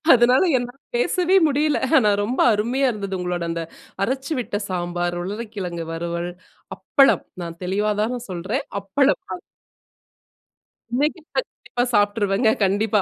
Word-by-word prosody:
அதனால 245 +2 +4 0.2
என்னால 245 +1 -5 0.2
பேசவே 370 -5 +2
முடியல. 295 +1 +1 0.2
ஆனா 210 -3 +3
ரொம்ப 245 +5 -2
அருமையா 245 +6 +1
இருந்தது 200 -3 -4
உங்களோட 180 -1 -2
அந்த 165 0 -3 0.4
அரைச்சு 265 +7 -2
விட்ட 235 - -4
சாம்பார், 175 -1 -2
உருளைக்கிழங்கு 195 -5 -5
வறுவல், 170 +1 -3 0.5
அப்பளம். 275 -2 +3 0.2
நான் 170 0 -7
தெளிவா 205 +4 0
தான 245 +2 -2
சொல்றேன், 185 +3 -3 0.2
அப்பளம். 270 - +2 1.7
இன்னைக்கி 300 +6 0
கண்டிப்பா 245 - -2
சாப்பிட்டுருவேங்க 205 +1 +2
கண்டிப்பா, 205 +2 +2
210 Hz, 115 wpm, -22 LUFS, 180-255 Hz, 1.7 s, அதனால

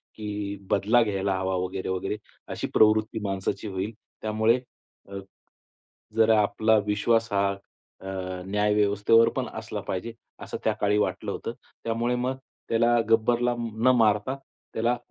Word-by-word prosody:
की 105 -1 -4 0.2
बदला 110 +5 +4
घ्यायला 100 -2 -1
हवा 95 0 -1
वगैरे, 95 0 -4
वगैरे, 95 +3 -2 0.3
अशी - - -3
प्रवृत्ती 110 +1 +4
माणसाची 95 +2 -2
होईल. 95 +2 -3 0.3
त्यामुळे 110 +3 +2 0.5
अ, 100 - -6 1.0
जर 110 0 +5
आपला 110 +1 +3
विश्वास 115 +2 +1
हा 100 0 +3 0.5
अ, 95 - -9 0.4
न्यायव्यवस्थेवर 105 +2 +3
पण - - -1
असला - - -5
पाहिजे 95 +5 -3 0.3
असं - - -5
त्याकाळी 105 0 +2
वाटलं 105 - -1
होतं. - - -4 0.3
त्यामुळे 115 +2 0
मग 125 +2 -1 0.3
त्याला 120 +1 +3
गब्बरला 120 +2 +3
न 115 +1 +1
मारता 110 +4 +2 0.4
त्याला 120 +2 +1
110 Hz, 125 wpm, -26 LUFS, 100-115 Hz, 1.0 s, जर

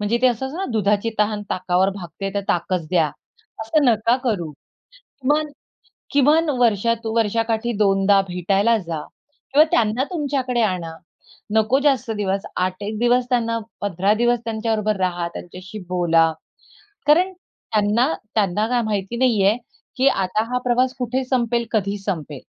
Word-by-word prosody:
म्हणजे 210 +3 0
ते - - +6
असं 250 +1 0
असतं 285 +6 -7
ना 385 - -1
दुधाची 210 +1 +1
तहान 210 0 +1
ताकावर 185 +1 +1
भागते 195 +1 -6
तर 200 - +1
ताकच 175 -1 0
द्या. 170 -4 +3 0.5
असं 255 +7 +1
नका 230 -1 +3
करू, 185 -10 -1 0.5
"किमान-किमान 295 - -3 0.9
वर्षात, 230 0 +2
वर्षाकाठी 225 +1 0
2 195 -1 +4
भेटायला 195 +6 +2
जा 165 -6 -5 0.5
किंवा 295 +2 +8
त्यांना 225 +2 +2
तुमच्याकडे 270 -6 -1
आणा. 180 -6 -1 0.6
नको 220 +5 +3
जास्त 260 -5 +2
दिवस 195 -1 -1
8, 185 0 0
1 210 +1 -4
दिवस 245 +1 +3
त्यांना 230 -2 +1 0.2
15 200 0 +1
दिवस 240 +2 +2
त्यांच्याबरोबर 220 -1 -1
राहा, 175 -2 -1
त्यांच्याशी 185 +4 -9
बोला. 165 -2 +3 0.8
कारण 350 +6 +4
त्यांना 230 - -1 0.2
त्यांना 210 +1 +1
काय 245 0 +1
माहिती 210 +1 -2
नाहीये, 220 -4 +3 0.4
की 265 - +3
आता 195 -3 +1
हा - - +2
प्रवास 250 +1 +2
कुठे 255 +2 -1
संपेल, 240 -2 0
कधी 205 -2 0
संपेल." 155 -8 -4
220 Hz, 140 wpm, -21 LUFS, 195-240 Hz, 0.9 s, किंवा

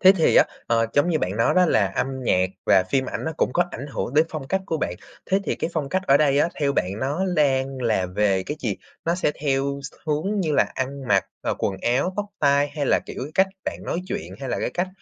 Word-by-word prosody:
Thế 190 0 +8
thì 165 -5 +3
á, - - +8 0.2
ờ, 115 -1 +2
giống 145 +5 +3
như 155 - +2
bạn 95 -7 -2
nói 115 - +2
đó 185 0 +5
là, 105 -10 +3
âm 95 +6 -1 0.2
nhạc 95 -5 +2 0.2
và 95 -1 +6
phim 135 -1 +2
ảnh - - -4
nó 160 - -2
cũng - - +1
có 175 - +3
ảnh 135 - -6
hưởng 140 -2 -4
đến 155 +2 +5
phong 150 -4 -6
cách 190 0 +1
của 160 - -1
bạn, 90 - -2 0.3
thế 195 - +2
thì - - -1
cái 165 - -2
phong 150 -4 -2
cách 185 +3 0
ở 135 - +6
đây 145 -1 +3
á, 160 - +3
theo 140 -1 +2
bạn 90 -4 0
nó 145 +8 0
đang 135 -3 +1
là 110 -6 +1
về 95 0 +1
cái 150 +9 -5
gì? 110 -6 -1 0.3
Nó 170 - +1
sẽ 175 -4 +1
theo 140 -1 0
x - - -23
hướng 185 +8 0
như 160 -4 0
là - - +5
ăn 135 0 -4
mặc 100 -1 +4 0.2
rồi, - - 0
quần 95 - -1
áo, 135 +10 +1
tóc 205 - -1
tai 140 0 +3
hay 145 -1 -3
là, - - +4
kiểu, 135 +4 -6
cách 190 - +5 0.2
bạn - - -3
nói 170 - -2
chuyện 200 +1 -4
hay 135 - -4
là, - - -1
cái - - -1
cách 180 +1 -1
140 Hz, 265 wpm, -23 LUFS, 125-160 Hz, 0.3 s, Thế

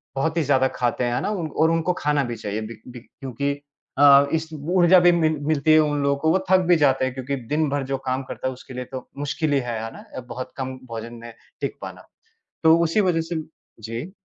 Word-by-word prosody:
बहुत 160 +5 -1
ही - - +3
ज़्यादा 130 -1 +3
खाते 125 0 0
हैं, 120 0 0
है - - -1
ना? - - -2
उन 180 -6 -2
और 160 +1 +2
उनको 165 +2 +1
खाना 145 -1 +1
भी 120 -1 -4
चाहिए 105 0 -4
बी 110 +1 -7
बी 125 -1 -9
क्योंकि, 135 +3 -4 0.5
अ, 140 -1 +8
इस 160 0 -1
ऊर्जा 175 +4 +4
भी 175 - +6
मिल 160 -2 +2
मिलती 155 0 +3
है 155 - +7
उन 145 -1 +1
लोगों 140 0 +2
को, 160 0 +3
वो 190 - +3
थक 185 - +7
भी - - +7
जाते 135 -3 +3
हैं, 130 - -3
क्योंकि 135 +1 -3 0.2
दिन 155 -1 +1
भर 145 0 -1
जो - - 0
काम 130 +1 -1
करता 130 - -5
है 130 - -2
उसके 130 +1 -12
लिए 125 0 -4
तो 130 -1 -7
मुश्किल 145 +1 -1
ही 140 - +3
है, 120 -3 -4
है 115 - -6
ना? - - -12 0.2
बहुत 125 +2 -7
कम 130 -1 -4
भोजन 115 0 -7
में 120 - -9 0.3
टिक - - -2
पाना। - - -9 0.6
तो 160 +1 +7
उसी 165 +6 +1
वज़ह 165 -1 0
से 160 -2 -2 0.4
जी। 115 - -6
140 Hz, 240 wpm, -23 LUFS, 125-160 Hz, 0.6 s, अ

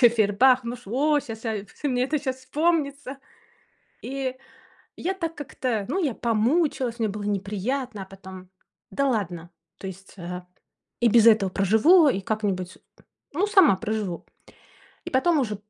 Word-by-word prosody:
Ещё 240 - +8
Фейербах. 235 +3 +3
Ну, 240 +1 -4
ш 245 - -17
о, 290 +8 +2
ща 230 -4 -7 0.2
я 205 -2 -4
в 295 - -22
мне 250 -1 +1
это 300 +3 0
щас 260 -3 -2
вспомнится. 280 0 -1 0.8
И 265 -1 -4 0.6
я 375 +2 -2
так 330 -3 -4
как-то 250 -7 -3
Ну, 375 -1 0
я 270 -6 0
помучилась, 240 +2 0
мне 225 - +1
было 205 +1 -5
неприятно, 205 +3 -3
а - - -12
потом 190 -1 -12 0.4
да 275 +8 0
ладно, 175 -8 -2 0.3
то 195 - -6
есть, 190 +1 -10
э, 180 +1 -6 0.6
и 240 - +4
без 230 0 +6
этого 210 -4 +5
проживу 220 - +5
и 195 - 0
как-нибудь 190 -3 -2 0.6
Ну, 365 +8 +1
сама 385 - +6
проживу, 215 -5 -3 0.8
и - - -6
потом 305 +5 +3
уже 215 -6 -1
235 Hz, 155 wpm, -25 LUFS, 200-275 Hz, 0.8 s, Ещё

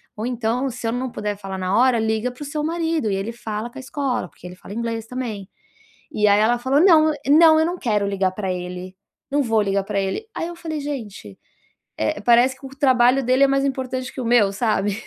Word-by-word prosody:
"Ou 215 - -4
então, 245 +2 -1
se 235 -1 -5
eu - - 0
não 250 +1 -3
puder 210 -1 -4
falar 195 -1 -6
na 185 +1 0
hora, 250 -1 +4
liga 220 +2 -1
para 250 - -17
o - - -4
seu 295 +1 -3
marido 325 -7 -1
e - - 0
ele 195 +4 -3
fala 220 -1 -5
com - - -13
a 270 - -6
escola, 275 -8 -2
porque 180 - -13
ele 180 - -10
fala 195 - -11
inglês 230 -1 -3
também", 225 -6 -5 0.6
e 210 -7 +1
aí 205 0 +5
ela 230 +3 +3
falou: 270 +4 +2
"Não, 315 -4 +5
não, 315 +2 +6
eu 320 - +3
não 355 - -3
quero 210 -5 0
ligar 195 -2 0
pra 190 -1 -3
ele, 180 +1 -7 0.4
não 290 0 +2
vou 225 -2 +2
ligar 200 -1 0
pra 200 -1 -1
ele", 195 - -3
aí 330 - -3
eu 345 - -7
falei: 320 -3 -5
"Gente, 215 - -7 0.6
eh, 110 - -1
parece 240 +4 +4
que - - -12
o - - -7
trabalho 260 -1 +4
dele 255 +3 +3
é - - +6
mais 275 0 +1
importante 260 -1 -3
que - - -5
o - - -4
meu", 230 -4 +3
sabe. 205 -2 0
240 Hz, 235 wpm, -21 LUFS, 205-275 Hz, 0.6 s, não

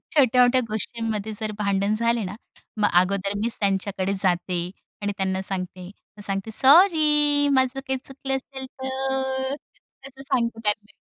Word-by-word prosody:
छोट्या-मोठ्या 255 -2 +5
गोष्टींमध्ये 220 -1 -3
जर 215 -1 -2
भांडण 200 0 +1
झाले 235 0 +1
ना 190 +2 -5 0.4
मग 210 -1 +2
अगोदर 195 +1 -1
मीच 230 0 0
त्यांच्याकडे 195 -1 0
जाते 175 -1 0 0.4
आणि 205 0 -1
त्यांना 190 0 -1
सांगते 185 -1 -4 0.3
मग - - -10
सांगते 195 +2 -3
सॉरी 295 - +5
माझं 260 0 +2
काही 265 -1 -3
चुकलं 270 0 -3
असेल 265 0 -7
तर 265 0 -2 0.5
तसं 270 0 -14
सांगते 240 -5 -1
त्यांना. 210 0 -1
230 Hz, 135 wpm, -24 LUFS, 200-265 Hz, 0.5 s, छोट्या-मोठ्या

